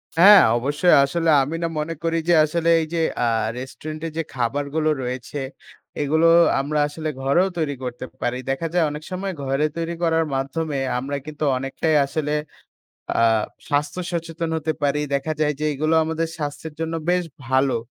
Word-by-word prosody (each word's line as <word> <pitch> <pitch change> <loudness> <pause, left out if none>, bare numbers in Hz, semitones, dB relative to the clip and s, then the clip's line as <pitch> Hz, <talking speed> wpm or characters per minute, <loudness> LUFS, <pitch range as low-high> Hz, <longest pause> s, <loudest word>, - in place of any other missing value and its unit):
হ্যাঁ, 195 +4 +9 0.2
অবশ্যই 145 +8 +3
আসলে 165 +4 0
আমি 145 +5 -4
না - - +1
মনে 155 +2 -2
করি 165 0 +1
যে - - +6
আসলে 170 +2 0
এই - - -2
যে 165 - +1 0.2
আ - - +2 0.3
রেস্টুরেন্ট 155 +4 -7
এ - - -4
যে 165 - 0
খাবারগুলো 140 +5 -1
রয়েছে 125 +3 -5 0.6
এগুলো 160 +3 +3 0.3
আমরা 150 +2 -1
আসলে 155 +1 -5
ঘরেও 140 +8 +3
তৈরি 150 -4 -1
করতে 125 0 -5 0.2
পারি। 125 +1 -1
দেখা 135 +5 -1
যায় 175 -1 +3
অনেক 150 +1 -7
সময় 190 +1 -3
ঘরে 135 +2 +1
তৈরি 170 0 -2
করার 165 -1 +2
মাধ্যমে 140 +3 -2 0.2
আমরা 140 +2 -3
কিন্তু 155 0 -6
অনেকটাই 135 +4 -1
আসলে 150 +1 -2 0.9
আ - - +4 0.5
স্বাস্থ্য 150 +4 0
সচেতন 165 -1 -3
হতে 160 0 -1
পারি। 145 +1 +1
দেখা 140 +3 -1
যায় 150 -1 +2
যে - - -1
এগুলো 155 +3 +1
আমাদের 160 +1 -2
স্বাস্থ্যের 150 +1 -5
জন্য 165 0 -2 0.2
বেশ 180 0 +2 0.2
ভালো 130 0 +2
155 Hz, 170 wpm, -22 LUFS, 140-165 Hz, 0.9 s, হ্যাঁ